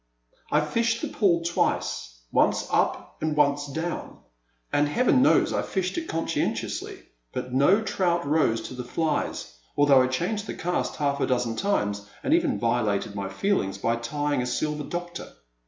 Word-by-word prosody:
I 150 - +4
FISHED 230 +9 0
the - - 0
pool 170 -5 +2
twice, - - -1
once - - +2
up - - 0
and 155 -1 -1
once 145 0 +3
down, 160 +5 -4 0.6
and 145 0 +3
heaven 250 - +3
knows 270 - +4
I - - +1
fished 185 -2 -2
it 335 -1 -3
consci 165 0 -1
entiously; - - -3 0.3
but 125 - -5
no 180 +12 +4
trout 175 -5 0
rose 140 -7 +2
to 130 - -7
the 125 0 -5
flies, 150 - -2 0.2
al 145 - +5
though 135 -2 +7
I 130 - +3
changed 185 +11 -2
the - - -4
cast 180 +1 -2
half 140 -2 0
a - - +1
dozen 120 -3 0
times 105 - -1
and 285 - +2
even 330 -4 +2
violated 115 -4 0
my 100 -1 -4
feelings 100 - 0
by 115 +1 0
tying 145 +4 -1
a 125 - -2
Silver 150 +2 -2
Doctor. 175 +1 -6
150 Hz, 170 wpm, -26 LUFS, 125-180 Hz, 0.6 s, though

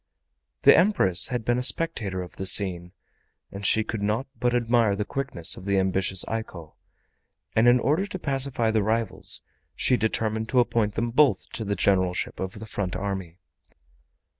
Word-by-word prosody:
The - - +8
Empress 95 - +3
had 125 -3 -4
been 120 +1 +1
a - - -1
spectator 105 - +1
of 90 - -13
the 95 - 0
scene, 90 -2 +2 0.6
and 100 +1 -8
she 110 +2 +3
could 110 -1 -5
not 105 +6 -1
but 125 -1 0
admire 115 -3 +2
the 105 +1 -3
quickness 135 -12 -1
of 95 - -11
the 100 -1 0
ambitious 95 -1 0
Eiko, 95 -8 -6 0.8
and 110 +2 +4
in 120 +1 +5
order 155 +10 0
to 190 - -6
pacify 135 -7 +1
the 110 -1 +1
rivals 110 +1 0 0.3
she 125 - +2
determined 110 0 -2
to 125 - +2
appoint 115 -3 0
them 120 0 -2
both 140 +2 +2
to 115 - -5
the 100 -1 -2
Generalship 95 -1 0
of 95 0 -4
the 110 - -8
front 100 -4 -4
army. 95 -3 -5
110 Hz, 170 wpm, -25 LUFS, 95-120 Hz, 0.8 s, The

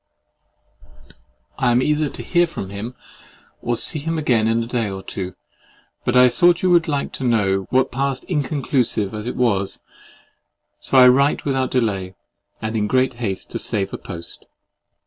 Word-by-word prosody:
I 125 - +2
am 120 0 +3
either 150 0 +1
to - - -7
hear 175 -1 +2
from 100 - -7
him, 110 +5 -6 0.7
or 120 0 -1
see 155 - +3
him 165 +3 -3
again 120 -8 +2
in 115 +1 +1
a - - -5
day 115 -3 -2
or 95 0 -6
two; 95 -2 -6 0.7
but 120 - 0
I 125 0 +8
thought 175 +7 +3
you 185 - +3
would 170 -2 +4
like 145 -3 -2
to - - -6
know 95 -6 +1
what 130 +1 +2
passed 135 +1 -2
inconclusive 135 - -1
as 105 +1 -5
it - - -3
was—so 115 +3 -4
I 125 -1 +9
write 140 +3 +3
without 135 -2 0
delay, 100 -7 -1 0.5
and 110 +1 -3
in 105 -1 0
great 130 +3 +2
haste 95 -5 -3
to - - -2
save 100 -2 -1
a - - -5
post. 85 -2 -9
125 Hz, 165 wpm, -21 LUFS, 105-140 Hz, 0.7 s, I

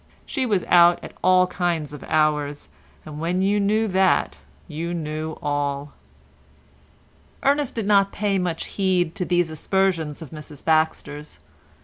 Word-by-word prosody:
She 265 -3 -2
was 200 -5 +1
out 175 0 +6
at - - -9
all 185 0 +5
kinds 175 -5 -2
of 150 - -9
hours, 150 -2 0 0.4
and 150 -1 -8
when 175 +3 0
you 205 +2 +2
knew 215 +2 +2
that 185 - +2 0.3
you 170 +3 -4
knew 155 0 -4
all. 145 -1 -2 1.5
Ernest 285 -1 +1
did 225 -3 -2
not 200 -1 +4
pay 200 -2 0
much 175 -3 -2
heed 185 -4 0
to 180 - -3
these 175 -2 +1
aspersions 165 -2 0
of 150 - -12
Mrs 150 -2 -10
Baxter's. 155 - 0
170 Hz, 140 wpm, -23 LUFS, 150-190 Hz, 1.5 s, out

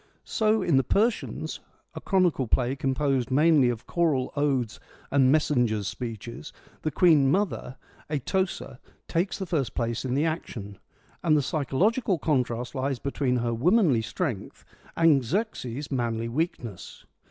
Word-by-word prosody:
So 215 -2 +1
in 165 -7 +3
the 135 - +4
Persians, 220 - 0 0.3
a - - -7
chronicle 180 - +2
play 125 +3 +1
composed 135 -1 0
mainly 145 -1 +4
of 115 -2 -4
choral 155 -7 0
odes 135 -6 0 0.3
and 135 -2 +4
messengers' 120 -9 +1
speeches, 115 - -6 0.3
the 155 - -1
queen 155 -3 +4
mother, 185 -7 -1 0.3
Atossa, 150 -2 -2 0.3
takes 175 +4 -1
the 190 - -4
first 150 -9 -2
place 115 -1 -2
in 130 -1 -1
the 145 +3 +2
action, 110 - -5 0.4
and 155 -3 +3
the 145 - +1
psychological 180 - +1
contrast 125 -5 -1
lies 135 0 -1
between 135 0 -1
her 120 -1 0
womanly 155 - +3
strength 110 - -4 0.3
and 160 -5 +5
Xerxes' 145 - -3
manly 115 -3 -1
weakness. 120 - -4
135 Hz, 135 wpm, -26 LUFS, 120-165 Hz, 0.4 s, and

